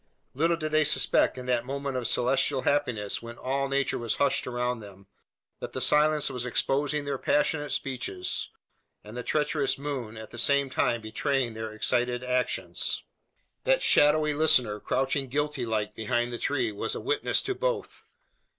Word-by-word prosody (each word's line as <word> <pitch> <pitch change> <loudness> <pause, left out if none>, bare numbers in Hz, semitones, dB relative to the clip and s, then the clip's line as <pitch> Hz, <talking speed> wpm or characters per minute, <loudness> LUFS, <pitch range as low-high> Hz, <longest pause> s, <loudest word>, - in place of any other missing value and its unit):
Little 165 +5 +1
did 155 -1 -4
they 155 0 +4
suspect, 150 -2 +3
in 125 - -6
that 125 -2 +1
moment 140 +1 -4
of 125 -3 -1
celestial 130 +2 +1
happiness 125 -8 0
when 115 0 -9
all 135 +1 -1
nature 140 0 0
was 115 -2 -1
hushed 140 -1 +1
around 125 -1 -1
them, 100 -2 -13 0.5
that - - -7
the - - -3
silence 150 0 +3
was 125 -1 -3
exposing 145 +4 0
their 140 -2 -2
passionate 150 0 +1
speeches, 125 -9 -2 0.5
and 105 +2 -11
the 125 - -3
treacherous 150 +1 0
moon, 135 -6 -5
at 110 0 -9
the 120 - -7
same 140 +1 +2
time, 120 -2 +1
betraying 120 +2 -1
their 110 0 -5
excited 120 +3 0
actions. 125 0 -1 0.6
That - - +2
shadowy 150 +1 +4
listener, 125 -8 +3
crouching 135 +3 -1
guilty 145 -1 -2
like 105 -2 -1
behind 120 +2 -1
the 120 - -4
tree, 125 -6 0
was 110 +2 -3
a - - -3
witness 430 +1 0
to 395 - -1
both. - - -3
130 Hz, 165 wpm, -27 LUFS, 120-145 Hz, 0.6 s, they